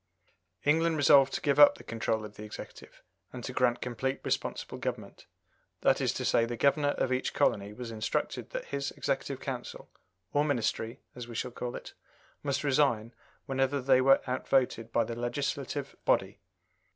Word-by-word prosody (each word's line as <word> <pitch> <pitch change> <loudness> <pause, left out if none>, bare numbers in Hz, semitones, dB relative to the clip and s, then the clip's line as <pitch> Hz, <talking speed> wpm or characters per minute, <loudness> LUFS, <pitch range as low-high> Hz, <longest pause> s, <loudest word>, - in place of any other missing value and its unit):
England 160 +2 +3
resolved 140 -2 +6
to - - -3
give 145 0 +1
up 145 - +9
the - - -13
control 110 -1 -2
of 105 0 -11
the 105 - -9
Executive, 105 - -10 0.3
and 125 -1 -8
to 125 - -5
grant 125 -1 +2
complete 130 +2 -2
responsible - - -3
government - - -5 0.5
that - - +3
is - - +2
to - - -4
say, 115 - +3
the 120 +1 -3
Governor 145 +3 +2
of 130 - +1
each 130 - -2
colony 100 0 +1
was 115 +2 -7
instructed 110 -1 -2
that - - -5
his 140 0 -3
Executive - - -2
Council - - -6 0.4
(or 145 - +3
Ministry, 120 -3 -1
as 125 -1 -8
we 120 - -9
should 125 +2 -3
call 120 0 -5
it) - - -9 0.5
must 140 0 -1
resign 130 -5 +2 0.3
whenever 135 0 0
they 130 0 +4
were 135 +1 +5
out 130 0 -3
voted 120 -4 +1
by 115 - +3
the 115 +1 -5
legislative 135 +3 -3
body. - - +1
130 Hz, 175 wpm, -30 LUFS, 115-140 Hz, 0.5 s, up